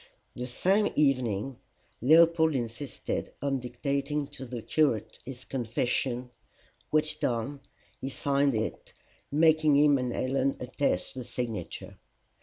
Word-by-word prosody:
The 125 0 -5
same 195 - +2
evening 130 -4 +1 0.4
Leopold 160 +3 +5
insisted 120 +2 -4
on 135 -1 0
dictating 140 +4 -2
to 140 -2 -8
the 120 -2 -6
curate 145 -9 +1
his 130 -1 -8
confession, 125 0 -1 0.6
which 155 0 +1
done, 125 +4 -1 0.4
he 135 - -3
signed 140 -1 +1
it, 110 0 -3 0.4
making 155 0 +4
him 145 -1 +5
and 125 -1 -1
Helen 135 +2 0
attest 125 -6 -1
the 130 - -6
signature. 120 -2 -5
135 Hz, 115 wpm, -29 LUFS, 125-145 Hz, 0.6 s, Leopold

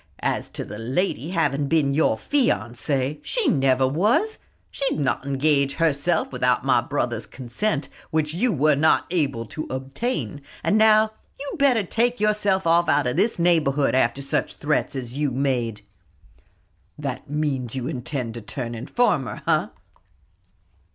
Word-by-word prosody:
As - - -1
to - - -6
the 105 +1 -8
lady 135 - -1
having 145 -5 0
been 145 -3 +2
your 145 -6 +3
fiancée 135 - 0
she 480 -7 0
never 135 - +3
was; 215 - +1 0.3
she 275 -1 -1
would - - -4
not 135 - -1
engage 140 0 +2
herself 165 +1 +1
without - - +1
my - - +4
brother's - - -2
consent, 140 - -3 0.2
which 155 -1 0
you 230 +8 +1
were 150 -2 +3
not 155 +3 +3
able 140 -9 0
to 155 +9 -6
obtain. 135 - -3 0.2
And - - +2
now 215 0 +5 0.3
you'd 280 0 -6
better 255 -6 +4
take 240 +6 0
yourself 205 -3 +1
off 170 +1 +3
out 145 -1 +3
of 125 +1 -1
this 205 +7 +1
neighborhood, 155 -5 +2
after 130 +1 +1
such 140 - -2
threats 150 -1 -1
as 125 -3 -5
you've 140 -2 -1
made!" 125 -5 -1 1.1
"That 140 -1 -5
means 140 -5 -2
you 130 -1 -3
intend 125 -4 -4
to 115 - -7
turn 120 +2 -5
informer, 150 - 0
eh?" - - +2
145 Hz, 150 wpm, -23 LUFS, 130-180 Hz, 1.1 s, now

